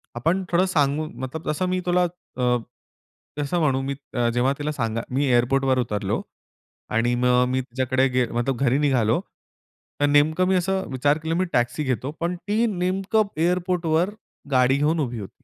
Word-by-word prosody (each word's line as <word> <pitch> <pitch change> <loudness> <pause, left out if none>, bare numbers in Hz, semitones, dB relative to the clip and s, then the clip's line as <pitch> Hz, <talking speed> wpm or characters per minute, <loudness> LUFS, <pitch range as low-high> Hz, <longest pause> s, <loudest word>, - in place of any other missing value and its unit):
आपण 165 +10 0
थोडं 180 +2 +4
सांगू 155 -3 +1 0.2
मतलब 155 +5 -5
तसं 170 +5 -1
मी 185 0 0
तुला, 180 0 +3 0.3
अ, 125 -1 +2 0.8
तसं 145 +5 0
म्हणू 135 -4 +2
अ, - - -2
मी 140 0 -2 0.4
जेव्हा 130 +3 +2
तिला 150 +1 -2
सांगा 115 -4 -2
मी 140 +3 +1
एअरपोर्टवर 130 +2 +2
उतरलो 105 -4 -1 0.8
आणि 120 +1 +2
मग 125 0 +3
मी 130 0 0
तिच्याकडे, 130 +1 0
गे 125 -1 +1
मतलब 120 +2 -1
घरी 130 0 +3
निघालो, 130 -3 +2 0.8
तर - - +5
नेमकं 155 +5 +3
मी 190 - +3
असं 190 +1 0
विचार 145 +3 +2
केला, 165 +1 -1
मी 185 +1 +1
टॅक्सी 120 +5 +1
घेतो, 130 +1 -2
पण 175 +1 -1
ती 210 +6 0
नेमकं 195 +3 0
एअरपोर्टवर 175 0 +1 0.4
गाडी 130 +1 +4
घेऊन 155 +3 +1
उभी 120 -5 -2
होती. 100 - -11
145 Hz, 165 wpm, -23 LUFS, 125-175 Hz, 0.8 s, तर